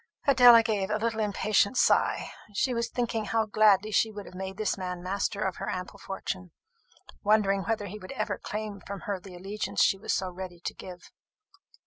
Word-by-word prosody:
Adela 245 -4 +8
gave 210 -4 -1
a 215 - +1
little 225 0 -1
impatient 210 +2 +1
sigh. - - +2 0.2
She 255 +5 +1
was 235 0 -1
thinking 230 -3 -2
how 225 +1 +1
gladly 215 -1 +4
she 220 - +3
would 205 -1 -8
have - - -12
made 190 +1 -6
this 215 -2 0
man 180 -2 -5
master 200 +2 -1
of 190 -1 -2
her - - -4
ample 185 0 -5
fortune; 185 -1 -5 0.7
wondering 200 -2 +3
whether 220 -2 -1
he 205 +2 -7
would 185 - -9
ever 205 -6 -2
claim 210 -1 -5
from 200 -1 -6
her 200 -4 -3
the 185 -1 -12
allegiance 195 +4 -1
she 195 - +3
was - - -3
so 185 -1 -1
ready 180 -1 -8
to - - -4
give. 180 -1 -11
205 Hz, 190 wpm, -28 LUFS, 190-215 Hz, 0.7 s, Adela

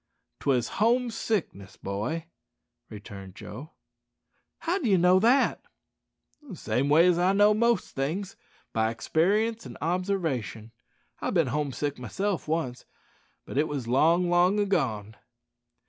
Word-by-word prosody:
"'Twas 125 -4 +1
home 240 +2 +3
sickness, 195 - -3
boy," 115 +12 -4 0.6
returned 100 -3 -10
Joe. 150 - -10 0.9
"How 350 +4 0
d'ye 215 - +2
know 180 +2 +5
that?" 240 +7 +3 0.8
"The 275 -10 -10
same 140 -3 -1
way 160 +4 +6
as 180 -2 +4
how 180 +1 +3
I - - +3
know 205 +1 +5
most 235 -1 +1
things 165 +9 -3 0.4
by 110 0 +1
experience 205 - 0
an' - - -10
obsarvation. 160 - -2 0.5
I've - - -3
bin - - +4
home 150 -2 -1
sick 145 +2 -3
myself 190 +9 -3
once, 155 -6 -2 0.6
but 135 - -3
it 155 - +2
was 140 -6 -4
long, 165 +8 +3
long 175 +4 +3
agone." 110 - -1
165 Hz, 130 wpm, -27 LUFS, 125-200 Hz, 0.9 s, way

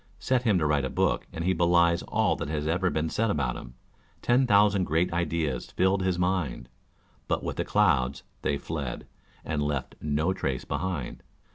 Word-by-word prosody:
Set 130 -2 +1
him 110 -6 +3
to 80 - +1
write 75 -2 +2
a 65 - -1
book, - - 0
and 85 - -4
he 95 - +3
belies 85 0 +3
all - - +2
that - - -5
has 75 -1 -2
been 80 - +1
ever 85 -3 0
said 115 +5 0
about 100 - 0
him - - -9 0.5
Ten 125 +2 +3
thousand 100 -3 +4
great 85 +2 +1
ideas 80 -6 -1
filled 95 +1 +1
his 95 -1 0
mind. 90 -9 -1 0.6
But - - -1
with - - -4
the - - 0
clouds 70 -11 +2 0.2
they 70 - 0
fled, 70 -4 -5 0.4
and 75 -1 -1
left 70 -3 -2
no 75 +4 0
trace 65 -8 -3
behind. 85 -8 -3
85 Hz, 180 wpm, -27 LUFS, 75-95 Hz, 0.6 s, thousand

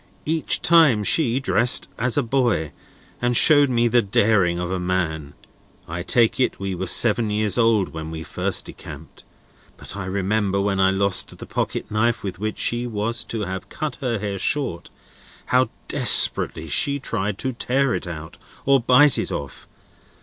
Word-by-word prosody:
Each 160 0 -1
time 160 -11 +4
she 130 +1 +1
dressed 120 -1 +2
as 125 +2 0
a 145 - +2
boy, 120 - -1 0.5
and 120 -1 +2
showed 145 -2 +7
the 120 -1 +2
daring 100 -4 +1
of 90 0 -4
a 95 - -2
man. 80 -5 -3 0.5
I 85 +2 -5
take 115 +6 +1
it 130 - 0
we 95 0 -4
were 95 +1 -4
seven 115 -1 +3
years 105 +2 0
old 115 -4 +2
when 80 -1 -7
we 80 0 -7
first - - -1
decamped; - - -12 0.5
but - - -7
I 100 -2 -6
remember, 100 +1 -1
when 100 -1 -1
I 95 0 +4
lost 95 0 +1
the - - -9
pocket - - -4
knife 115 +1 0
with 95 -3 -6
which 110 +1 -4
she 120 +1 0
was 115 +1 -2
to 115 - -5
have 95 -2 -6
cut 155 -4 -5
her 120 -4 -2
hair 100 -1 -5
short, 130 - -1 0.6
how 125 -1 +1 0.2
desperately 80 +1 +1
she 140 - +1
tried 105 -5 -3
to 130 +3 -3
tear 130 +2 0
it - - -4
out, 85 0 -9 0.3
or 135 0 +4
bite 130 +3 +4
it - - -4
off. 70 -2 -7
105 Hz, 170 wpm, -21 LUFS, 95-125 Hz, 0.6 s, showed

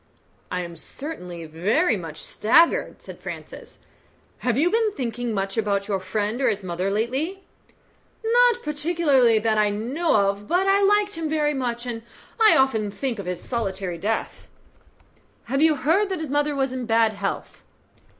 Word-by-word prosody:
"I 180 - -2
am 170 -1 -7
certainly 180 - -7
very 205 - +1
much 165 -5 -7
staggered," 330 - +2
said - - -10
Francis. - - -9 0.6
"Have 245 -1 0
you 335 +5 +3
been 450 -1 +2
thinking 245 - -3
much 195 0 -1
about 200 -2 0
your 200 -2 0
friend 210 +5 -2
or - - +3
his 205 -1 -2
mother 180 +1 -2
lately?" 265 - -2 0.8
"Not 485 +1 +4
particularly 295 -6 +2
that 215 0 +1
I 210 -1 +3
know 250 +11 0
of; 200 0 +1
but 360 +6 +2
I 390 +1 +4
liked 410 +1 +3
him 320 -1 -2
very 300 -1 +1
much, 245 -3 -3
and 235 -2 -4 0.4
I 440 -1 +6
often 240 -6 +2
think 230 +2 -3
of 195 - -6
his 180 -1 -4
solitary 190 -7 -3
death." 220 +5 -3 1.0
"Have 275 +4 -1
you 315 -1 +5
heard 330 +10 +2
that 375 -3 -2
his 310 -4 -5
mother 290 0 0
is 265 -1 0
in 255 -2 -4
bad 225 -1 +3
health?" 200 -1 -5
240 Hz, 165 wpm, -24 LUFS, 200-310 Hz, 1.0 s, I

